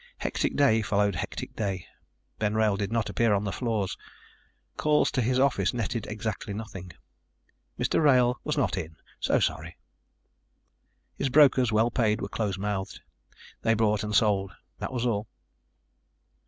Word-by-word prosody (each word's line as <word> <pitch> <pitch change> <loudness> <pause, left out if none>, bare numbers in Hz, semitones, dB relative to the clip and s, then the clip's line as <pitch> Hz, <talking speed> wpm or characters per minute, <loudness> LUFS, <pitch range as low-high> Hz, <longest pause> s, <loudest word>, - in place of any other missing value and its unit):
Hectic - - -2
day 135 -6 +4
followed 105 -1 +1
hectic 90 - -5
day. 95 -4 -3 0.5
Ben 105 0 0
Wrail 110 -2 +3
did 100 +1 -3
not 115 -2 0
appear 110 +1 +2
on 100 - -1
the 100 - -2
floor. 110 -4 -1 0.9
Calls 150 -1 +2
to 130 - 0
his 125 +2 +1
office 125 -7 +2
netted 115 -2 -2
exactly 105 -1 -4
nothing. 95 -5 -7 0.9
Mr. - - +1
Wrail 125 -3 +4
was 150 0 -2
not 135 -7 +1
in. 80 -2 -7 0.2
So - - +2
sorry. - - -2 1.4
His 140 - -2
brokers, 130 -4 +5
well 110 +2 +2
paid, 110 -3 +1
were - - -4
close 105 -4 -2
mouthed. 100 0 -3 0.6
They 115 0 +2
bought 105 -1 +1
and 105 0 -2
sold. 100 -2 +2 0.3
That - - -4
was 125 -1 -2
all. 105 -3 -1
110 Hz, 150 wpm, -27 LUFS, 100-120 Hz, 1.4 s, brokers